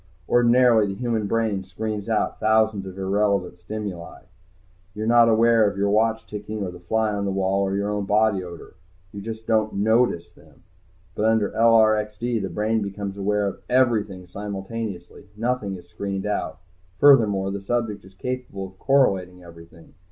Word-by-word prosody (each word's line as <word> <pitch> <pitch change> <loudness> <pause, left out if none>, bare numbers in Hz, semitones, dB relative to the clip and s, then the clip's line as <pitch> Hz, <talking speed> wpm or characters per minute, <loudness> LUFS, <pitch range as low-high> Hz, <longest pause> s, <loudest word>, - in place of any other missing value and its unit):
Ordinarily 120 -2 +4
the 95 - -4
human 115 -4 -1
brain 110 -3 0
screens 105 +2 -5
out 110 - 0
thousands 110 -2 +2
of 95 0 -9
irrelevant 95 -2 0
stimuli. 95 -2 -7 0.7
You're 110 +1 -3
not 115 0 +5
aware 115 -1 +4
of 100 - -9
your 100 0 +1
watch 110 +1 +1
ticking, 105 0 -6
or 90 - -4
the 90 - -11
fly 110 +5 0
on 100 0 -2
the 100 - -1
wall, 95 0 0
or 95 0 0
your 100 +1 -1
own 105 -1 -2
body 105 -1 +2
odor. 85 -2 -10 0.4
You 100 - -8
just 110 +1 -7
don't 110 -2 +1
notice 105 -5 +1
them. - - -22 0.5
But 105 - -1
under 110 -2 +2
LRXD, 110 0 +2
the 95 - -3
brain 110 +4 0
becomes 100 0 -5
aware 100 +1 0
of 100 - -6
everything 110 -7 +1
simultaneously. 100 0 -7
Nothing 115 -4 -2
is 90 -1 -12
screened 95 +3 -4
out. 90 -5 -3 0.4
Furthermore, 105 -9 +5
the 100 0 -5
subject 110 0 -2
is 95 0 -17
capable 125 -4 -5
of 95 0 -14
correlating 95 -10 +1
everything. 85 -1 -15
105 Hz, 165 wpm, -23 LUFS, 95-110 Hz, 0.7 s, not